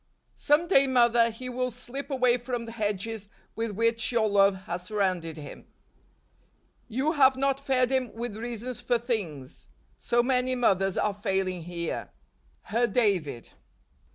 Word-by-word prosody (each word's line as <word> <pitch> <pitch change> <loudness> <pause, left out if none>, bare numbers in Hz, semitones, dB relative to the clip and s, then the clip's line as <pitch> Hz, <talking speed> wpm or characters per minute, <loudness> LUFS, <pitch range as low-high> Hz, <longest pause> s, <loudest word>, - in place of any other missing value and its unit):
Some 295 +4 +3
day, 275 -7 +5
mother, 235 -2 +4
he 230 +3 -8
will 255 0 -2
slip 250 +4 -8
away 255 -3 +3
from 240 -1 -4
the 230 - -8
hedges 210 -1 -3 0.3
with 225 +1 -2
which 230 +3 +1
your 230 -3 +2
love 195 -2 +3
has 175 +1 -4
surrounded 185 -4 -2
him. 145 -2 -10 0.6
" - - -39
You 290 +4 +2
have 270 -4 +4
not 275 0 +1
fed 265 -2 +1
him 260 -3 0
with 235 -2 -4
reasons 240 +2 -5
for 240 0 +1
things. 195 - -4 0.3
So 240 0 +2
many 255 0 +1
mothers 195 -6 +2
are 210 - +1
failing 190 -4 -2
here." 170 -1 -4 0.5
Her 235 +2 +1
David. 195 - 0
230 Hz, 150 wpm, -27 LUFS, 195-255 Hz, 0.6 s, day